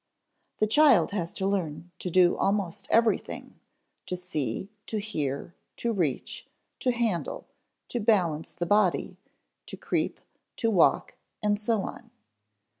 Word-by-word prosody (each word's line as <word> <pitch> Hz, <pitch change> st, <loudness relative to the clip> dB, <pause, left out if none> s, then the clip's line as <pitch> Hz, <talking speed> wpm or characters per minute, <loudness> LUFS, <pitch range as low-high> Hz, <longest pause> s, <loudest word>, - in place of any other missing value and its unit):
The 215 Hz, -, +3 dB
child 275 Hz, +3 st, +5 dB
has 175 Hz, -5 st, -2 dB
to 190 Hz, -, -2 dB
learn 175 Hz, -4 st, -2 dB
to 180 Hz, -, -3 dB
do 180 Hz, 0 st, +5 dB
almost 195 Hz, -3 st, -1 dB
everything: 230 Hz, -1 st, +1 dB, 0.5 s
to 180 Hz, -, -1 dB
see, 180 Hz, -, -3 dB, 0.2 s
to 220 Hz, -, -2 dB
hear, 155 Hz, -7 st, -3 dB, 0.2 s
to 235 Hz, -1 st, -1 dB
reach, 160 Hz, -, -2 dB, 0.3 s
to 255 Hz, -, +2 dB
handle, 230 Hz, -8 st, -1 dB, 0.4 s
to 240 Hz, -, -2 dB
balance 180 Hz, -8 st, +2 dB
the 175 Hz, -, -3 dB
body, 205 Hz, -1 st, +2 dB, 0.5 s
to -, -, -7 dB
creep, -, -, -1 dB, 0.4 s
to 230 Hz, -2 st, +1 dB
walk, 185 Hz, -5 st, +3 dB, 0.3 s
and 205 Hz, -1 st, +2 dB
so 215 Hz, -1 st, 0 dB
on. -, -, -8 dB
195 Hz, 130 wpm, -28 LUFS, 170-215 Hz, 0.5 s, child